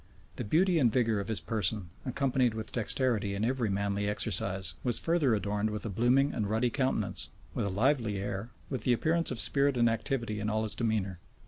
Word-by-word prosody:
The - - -3
beauty 170 - +3
and 120 -5 +4
vigor 115 -3 +1
of 100 - -4
his 110 -6 -1
person, 100 0 -1 0.2
accompanied 130 -2 +1
with 110 -1 -6
dexterity 110 -3 +1
in 105 +2 -1
every 125 -3 0
manly 100 +1 -1
exercise, 95 -4 0
was 120 -2 +1
further 160 -8 +2
adorned 105 +1 -1
with 105 +1 -4
a - - -2
blooming 125 +7 +2
and 105 -2 -2
ruddy 115 +3 +1
countenance, 130 0 0 0.2
with - - -1
a - - -1
lively 110 +1 +1
air, 100 +3 -4 0.2
with 130 -5 -4
the 125 - +3
appearance 165 +7 +1
of 125 - -3
spirit 140 +1 +3
and 120 -1 +4
activity 115 -1 -2
in 105 +1 -2
all 110 0 0
his 110 - -3
demeanor. 105 -6 -1
110 Hz, 200 wpm, -30 LUFS, 100-130 Hz, 0.2 s, and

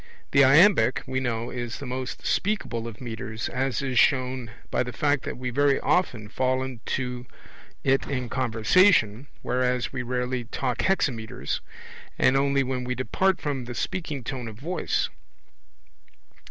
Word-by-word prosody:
The 140 - +6
iambic, 135 - +5
we 130 -1 -1
know, 120 -2 -2
is 120 -2 -4
the 140 - -7
most 130 0 -5
speakable 130 - -1
of 110 -3 -9
metres, 110 -3 -5
as 130 -1 -1
is 130 -3 +1
shown 130 -3 +2 0.2
by - - +1
the 125 -1 -2
fact 145 0 +1
that - - -4
we 125 0 -3
very 140 +2 +3
often 120 - +1
fall 130 +4 0
into 125 0 -4 0.6
it 135 0 +2
in 130 -3 -2
conversation, 120 - +3 0.2
whereas 125 0 0
we 130 - -2
rarely 125 0 -2
talk 125 0 -2
hexameters, 125 - -1 0.6
and 130 - +4
only 140 0 +3
when 130 -1 -2
we 125 0 -2
depart 190 +10 +1
from 140 -4 -3
the 120 0 -6
speaking 155 -6 -3
tone 125 -1 -5
of 110 - -7
voice. 165 +11 -1
130 Hz, 150 wpm, -26 LUFS, 120-140 Hz, 0.6 s, The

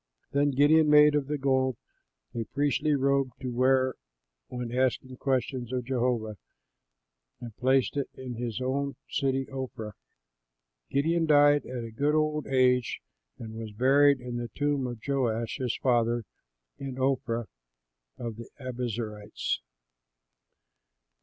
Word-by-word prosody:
Then 145 +1 +2
Gideon 150 +3 +4
made 150 0 +7
of 145 -2 0
the 150 0 -1
gold 130 -2 +1 0.6
a 115 - -3
priestly 145 +3 +1
robe 135 -2 +1
to 125 - -4
wear 130 +1 +3 0.5
when 125 -2 -5
asking 130 0 0
questions 130 -2 -1
of 125 -1 -2
Jehovah, 120 -4 -1 1.0
and 120 -3 -9
placed 130 +1 +2
it 140 - -1
in 130 -1 -6
his 120 -1 -4
own 140 +2 -1
city, 135 -1 0
Ophrah. 130 -5 -5 1.0
Gideon 165 +4 +1
died 145 -1 +5
at 125 -2 -5
a 115 - -7
good 145 +6 +1
old 155 -1 0
age 125 -2 +2 0.4
and 110 -1 -8
was 110 -1 -7
buried 140 +4 +4
in 125 -1 -5
the 120 0 -4
tomb 145 -3 0
of 120 -2 -6
Joash, 120 -5 0
his 125 -3 -1
father, 120 -2 +1 0.5
in 135 -2 -6
Ophrah 125 -3 0 0.7
of 115 -2 -5
the 115 - -9
Abiezerites. 115 -5 -3
130 Hz, 130 wpm, -28 LUFS, 120-140 Hz, 1.0 s, made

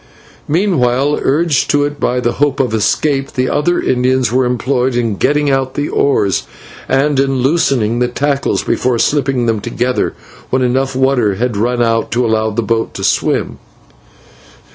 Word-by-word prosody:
Meanwhile, 145 -6 +1
urged 150 0 +1
to 145 0 +2
it 145 0 -5
by 125 - 0
the 120 -1 0
hope 145 +1 0
of 125 -4 0
escape, 135 +5 0
the 130 -1 0
other 160 +5 +1
Indians 130 -1 +1
were 130 +1 +2
employed 125 +1 0
in 115 -4 0
getting 145 +5 +1
out 135 -1 -1
the 145 +1 -2
oars, 105 -9 +1 0.4
and 135 +2 +2
in 135 -2 0
loosening 130 -6 +1
the 125 - +2
tackles 140 +3 -1
before 125 -1 0
slipping 135 -1 +1
them 115 -1 +1
altogether 125 +4 -2 0.3
when 130 0 +1
enough 130 +2 0
water 130 -6 +1
had 120 +2 -2
run 120 +3 0
out 115 -1 0
to 120 +1 +1
allow 110 -1 +1
the 110 +2 -2
boat 115 +2 -1
to - - -5
swim. - - 0
130 Hz, 165 wpm, -15 LUFS, 120-140 Hz, 0.4 s, to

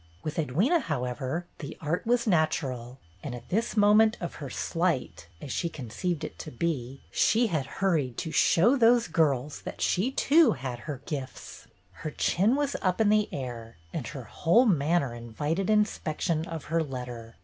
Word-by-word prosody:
With 155 +1 -4
Edwyna, 190 - +2
however, 135 - -3
the 140 - -7
art 165 +7 -2
was 240 0 +2
natural, 140 - 0 0.2
and 130 -4 -5
at 120 - -11
this 225 +4 -1
moment 215 +2 +5
of 175 - -4
her 140 - -5
slight 130 - -2
— 80 - -29
as 140 - -6
she 170 - -1
conceived 150 +5 -4
it - - -7
to - - -6
be 135 -2 -3
— - - -32
she 235 +2 +4
had 140 -4 0
hurried 155 -11 +1
to 160 - -3
"show 210 - +4
those 235 -3 +4
girls" 150 -4 0
that - - -7
she 205 +9 +1
too 295 0 +4
had 130 -3 -5
her 140 -3 -5
gifts! 135 -4 -7 0.3
Her 155 - -3
chin 195 - +2
was 285 -1 -1
up 185 0 0
in 220 -2 +4
the 210 0 +3
air 120 -4 -6 0.2
and - - -3
her - - -7
whole 225 +11 +3
manner 155 - +2
invited 145 - -3
in 210 -1 +5
spection 160 -4 -2
of 165 -4 -6
her 165 - +3
letter. 125 -5 -6
160 Hz, 180 wpm, -28 LUFS, 130-205 Hz, 0.3 s, moment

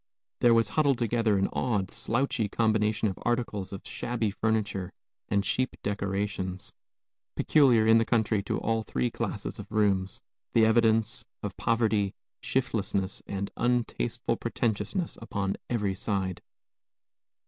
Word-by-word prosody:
There 120 -1 +5
was 115 -2 +3
huddled 140 0 +2
together 115 -3 +2
an 95 - +2
odd, 105 -7 0
slouchy 120 -2 0
combination 110 0 +2
of 95 - -4
articles 115 -5 -1
of 95 - -8
shabby 120 -3 -2
furniture 105 -3 -1 0.4
and 100 0 +2
cheap 130 +6 0
decorations, 100 -2 -2 0.6
peculiar, 125 -7 +4
in 110 +1 +6
the - - +3
country, 110 -3 +2
to - - -1
all 115 0 0
three 65 - -1
classes - - -4
of - - -9
rooms, 100 -3 +1 0.3
the 115 -1 +6
evidences 110 -1 +3 0.2
of - - -4
poverty, 110 -4 +1 0.3
shiftlessness, 100 -6 -1
and 100 0 -3
untasteful 120 -1 0
pretentiousness 120 - -2
upon 100 -4 -2
every 105 -5 0
side. 95 -2 -2
110 Hz, 125 wpm, -28 LUFS, 100-115 Hz, 0.6 s, in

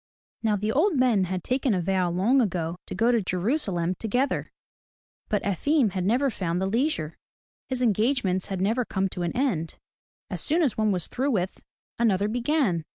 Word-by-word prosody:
Now 220 -2 +2
the 210 +2 -1
old 320 - +2
men 240 -7 +3
had 185 -1 -3
taken 255 -3 +1
a 180 - 0
vow 185 -1 +1
long 205 +10 +3
ago 170 -6 -1
to - - -5
go 230 +2 +3
to 235 -2 +2
Jerusalem 185 - -1
together, 245 +8 -1 0.8
but 210 - 0
Efim 230 - +2
had 185 -1 -2
never 250 +6 +2
found 180 -4 -2
the 190 - 0
leisure, 205 - -1 0.2
— - - -71
his 255 -1 -1
engagements 215 -4 +1
had 190 -2 -3
never 225 +6 +1
come 195 -4 -1
to 180 - -6
an 175 +5 -2
end. 195 - -1 0.6
As - - -3
soon 330 +3 +2
as 270 - +1
one 215 -1 +1
was 180 -4 -1
through 265 +3 -1
with, 190 -7 -2 0.4
another 205 -4 +2
began. 240 - +1
210 Hz, 185 wpm, -26 LUFS, 185-255 Hz, 0.8 s, men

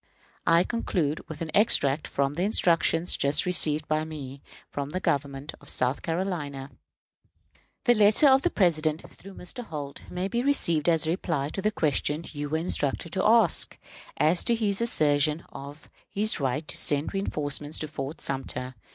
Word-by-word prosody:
I 165 +1 +5
conclude 175 -9 -2
with 160 -1 -8
an 160 - -6
extract 155 -9 +3
from 140 0 -1
the 165 - -3
instructions 170 -4 +2
just 140 +1 +2
received 155 -4 0
by 155 0 0
me 140 -4 -8 0.3
from 140 0 -4
the 185 - -3
government 140 -3 -2
of 145 - -15
South 125 +2 0
Carolina: 160 -6 -3 1.1
"The 240 - +5
letter 215 +6 +5
of 265 0 +6
the - - +1
President, 160 -4 +1
through 195 +1 -13
Mr. 210 +7 -8
Holt, 145 -7 -7
may 180 +2 -3
be 235 +4 -1
received 175 - +1
as 165 -1 +2
the 160 - 0
reply 160 -5 -2
to 195 - -5
the 210 - +2
question 155 -3 -1
you 145 -1 -5
were 160 - 0
instructed 160 -1 -2
to 190 - 0
ask, 220 -5 +4 0.4
as 160 +3 +2
to 235 - +2
his 210 -2 -1
assertion 150 -7 +1
of 140 +2 -10 0.2
his 215 0 +1
right 140 +3 -2
to - - -2
send 145 +1 +1
reënforcements 150 -6 -1
to 155 - -3
Fort 145 +1 -6
Sumter. 130 -1 -4
155 Hz, 170 wpm, -27 LUFS, 145-185 Hz, 1.1 s, of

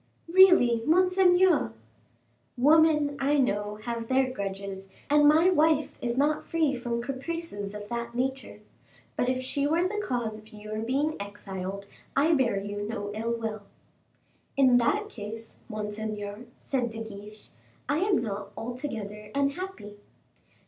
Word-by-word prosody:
"Really, 335 -10 +6
monseigneur 365 - +4 0.4
" 115 - -42
"Women, 305 -2 +5
I 285 +2 +2
know, 205 -5 0
have 235 -1 -4
their 260 0 +2
grudges, 195 -3 -5 0.2
and 295 0 +6
my 320 +5 +6
wife 310 -3 +2
is 240 0 -2
not 295 +2 +1
free 315 -4 +1
from 240 -1 -3
caprices 270 -6 -5
of 205 0 -7
that 235 0 -4
nature. 265 +2 -3 0.5
But 245 - 0
if 255 0 0
she 280 +2 0
were 335 +4 +2
the 420 +2 -3
cause 235 - -2
of 215 0 -18
your 215 0 -6
being 275 +7 0
exiled 200 -1 -6 0.3
I 305 +4 +4
bear 245 -9 +2
you 205 +1 -5
no 205 -1 -4
ill 225 +2 -2
will." 220 -2 -4 1.0
"In 260 -3 +6
that 410 - +1
case, 225 - -8
monseigneur," 210 +1 -5
said 250 -3 -2
De 225 0 -6
Guiche. 210 0 -11 0.4
"I 285 +3 +1
am 380 - +2
not 200 -3 -5
altogether 225 -4 -5
unhappy." 280 - -3
240 Hz, 140 wpm, -28 LUFS, 210-295 Hz, 1.0 s, Really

